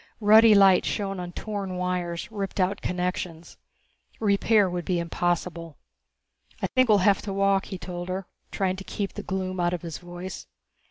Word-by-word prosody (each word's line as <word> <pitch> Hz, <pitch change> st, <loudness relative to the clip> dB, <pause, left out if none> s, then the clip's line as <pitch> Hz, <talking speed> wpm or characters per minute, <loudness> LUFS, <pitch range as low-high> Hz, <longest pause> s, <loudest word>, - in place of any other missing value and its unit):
Ruddy 215 Hz, +1 st, +7 dB
light 195 Hz, -2 st, +6 dB
shone 195 Hz, -2 st, -2 dB
on 175 Hz, -1 st, -5 dB
torn 200 Hz, -1 st, -5 dB
wires, 180 Hz, +1 st, -3 dB
ripped 200 Hz, -2 st, -4 dB
out 190 Hz, +2 st, +1 dB
connections. 180 Hz, -2 st, -4 dB, 0.6 s
Repair 205 Hz, 0 st, +3 dB
would 175 Hz, -1 st, -3 dB
be 180 Hz, 0 st, 0 dB
impossible. 170 Hz, -1 st, -2 dB, 0.8 s
"I -, -, -1 dB
think 255 Hz, -2 st, +2 dB
we'll 210 Hz, -, +6 dB
have 200 Hz, -2 st, +4 dB
to 205 Hz, -, -5 dB
walk," 195 Hz, 0 st, +2 dB
he 190 Hz, -, -6 dB
told 175 Hz, 0 st, -6 dB
her, 190 Hz, +1 st, -3 dB, 0.2 s
trying 190 Hz, -1 st, -1 dB
to 195 Hz, -, -7 dB
keep 200 Hz, 0 st, -4 dB
the -, -, -6 dB
gloom 185 Hz, -1 st, -3 dB
out 175 Hz, 0 st, +1 dB
of 175 Hz, -, -9 dB
his 165 Hz, -3 st, -6 dB
voice. 175 Hz, +1 st, -8 dB
185 Hz, 170 wpm, -26 LUFS, 175-200 Hz, 0.8 s, Ruddy